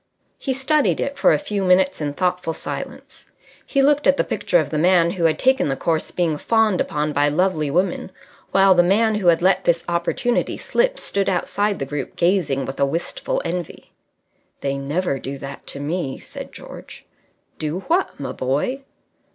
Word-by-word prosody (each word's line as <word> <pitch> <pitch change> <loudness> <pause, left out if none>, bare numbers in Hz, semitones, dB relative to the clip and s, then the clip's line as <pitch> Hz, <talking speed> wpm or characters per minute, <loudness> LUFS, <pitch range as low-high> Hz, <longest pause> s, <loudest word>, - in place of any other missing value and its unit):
He 265 -2 -2
studied 280 +2 +2
it 280 - -2
for - - +5
a - - +4
few 210 -9 -3
minutes 185 -1 +3
in 145 -1 -2
thoughtful 180 -2 -1
silence. - - -8 0.4
He 275 -1 +2
looked 290 +1 +3
at 280 - +4
the - - +2
picture - - +1
of - - -2
the 155 - 0
Man 170 0 +4
who 175 -2 -1
had 155 -1 +3
taken 260 -6 +3
the 135 - 0
course 160 +3 -1
being 165 -4 -1
fawned 220 -4 +2
upon 150 0 -1
by 145 0 +3
lovely 155 -1 +1
women, 180 +4 -1 0.4
while 195 0 +5
the 175 - +5
man 215 +5 +3
who 210 -4 -1
had 170 0 +4
let 190 +1 +3
this 170 -1 +2
opportunity 175 +8 0
slip - - 0
stood 200 -1 -1
outside 200 +2 0
the 135 - -3
group 140 -1 -5
gazing 170 -7 +1
with 135 - -7
a 140 - +4
wistful 165 +5 -2
envy. 175 0 -5 0.7
"They 140 0 -1
never 140 +2 -2
do 135 +2 -6
that 135 0 -9
to 140 - -5
me," 145 -1 -3
said - - -10
George. - - -11 0.5
"Do 155 +4 -3
what, 345 - 0
my 140 - -4
boy?" 145 - -1
175 Hz, 185 wpm, -21 LUFS, 150-205 Hz, 0.7 s, for